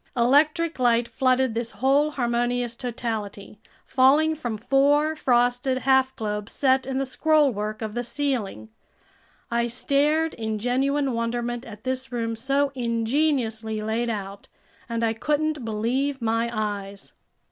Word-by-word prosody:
Electric 305 +6 +3
light 240 -1 +3
flooded 255 +1 +1
this 230 0 -2
whole 275 +3 +2
harmonious 240 -2 -1
totality, 220 -5 -5 0.3
falling 285 +5 +4
from 240 -8 -4
four 285 +6 +2
frosted 245 -1 +1
half 265 0 +3
globes 210 -1 -4
set 265 -1 +2
in 265 -1 -2
the 270 - 0
scrollwork 255 -7 +1
of 215 -1 -4
the 240 - -2
ceiling. 235 - -3 0.8
I 235 0 +1
stared 295 +6 +1
in 220 -1 -3
genuine 270 +5 0
wonderment 240 +1 -2
at 215 -1 -11
this 260 0 -3
room 230 -2 -2
so 275 +4 0
ingeniously 230 -2 0
laid 225 +2 -1
out, 200 -2 -5 0.4
and 230 0 -2
I 225 -1 +2
couldn't 300 +3 -1
believe 245 +6 -1
my 230 0 0
eyes. 205 -3 -4
245 Hz, 130 wpm, -24 LUFS, 225-275 Hz, 0.8 s, falling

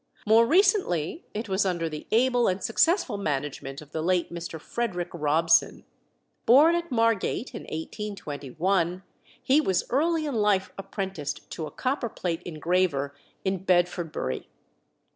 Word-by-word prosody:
More 225 +2 +5
recently 350 - +2
it 220 +2 -4
was 190 0 +1
under 175 -4 -1
the 155 -1 -7
able 245 +1 +3
and 185 +1 -1
successful 260 - +2
management 145 -3 -3
of 145 - -19
the 160 - -3
late 175 0 0
Mr. 170 -1 -6
Frederick 180 -2 -3
Robson. 165 +1 +2 0.6
Born 290 +8 +7
at 340 -2 -2
Margate 230 +1 +1
in 230 - -7
1821, 175 - -2 0.4
he 280 +4 +4
was 190 -10 +1
early 315 +4 +2
in 290 - -2
life 210 -4 +2
apprenticed 190 -6 -5
to 160 - -4
a - - -10
copperplate 235 - -2
engraver 165 -4 0 0.3
in 190 -1 -1
Bedfordbury. 175 - 0
190 Hz, 130 wpm, -26 LUFS, 165-230 Hz, 0.6 s, Born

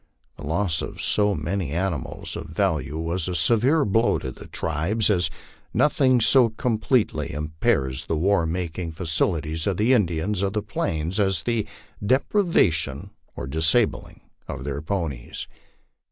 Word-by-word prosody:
The - - -11
loss 80 0 0
of - - -6
so 105 -1 +2
many 85 +1 -2
animals 85 -5 -3
of - - -6
value 70 +4 -1
was 80 +2 -2
a 90 - -2
severe 120 - +3
blow 115 +4 +2
to 65 - -5
the - - -12
tribe, 80 +8 -2
as 90 -5 +2 0.5
nothing 130 0 +4
so 120 +1 +5
completely 115 +1 0
impairs 75 -3 -1
the 80 - 0
war 90 0 +2
making 85 0 -3
facilities 80 -1 -1
for 100 - +1
the 110 +7 +3
Indians 95 -2 +1
of 100 -1 0
the 105 -1 -1
Plains 85 -2 -2
as 95 -2 +1
the 115 -3 -1 0.4
deprivation 100 - +1 0.2
or - - -5
disabling 80 - +1 0.3
of 65 - -6
their 70 +1 -3
ponies. 80 -8 -4
90 Hz, 140 wpm, -24 LUFS, 80-105 Hz, 0.5 s, so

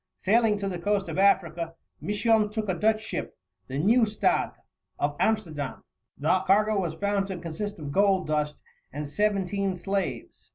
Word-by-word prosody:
Sailing 220 +1 +3
to 200 -1 -3
the 180 -3 -3
coast 200 +2 0
of - - -3
Africa, 170 -4 +2 0.3
Misson 210 +1 +2
took 215 0 -3
a 185 - +1
Dutch 215 +4 +1
ship, - - -5 0.3
the 130 - -4
Nieuwstadt, 215 - +2 0.4
of 145 0 -1
Amsterdam. 160 -11 -1 0.3
The 160 +6 +2
cargo 210 +1 +4
was 165 -3 -3
found 200 +1 0
to 190 -2 -4
consist 170 +5 -5
of 145 -3 -6
gold 195 +1 +3
dust 150 -1 -1 0.3
and 150 0 -5
seventeen 200 +2 0
slaves. 195 +2 -4
195 Hz, 155 wpm, -27 LUFS, 170-210 Hz, 0.4 s, cargo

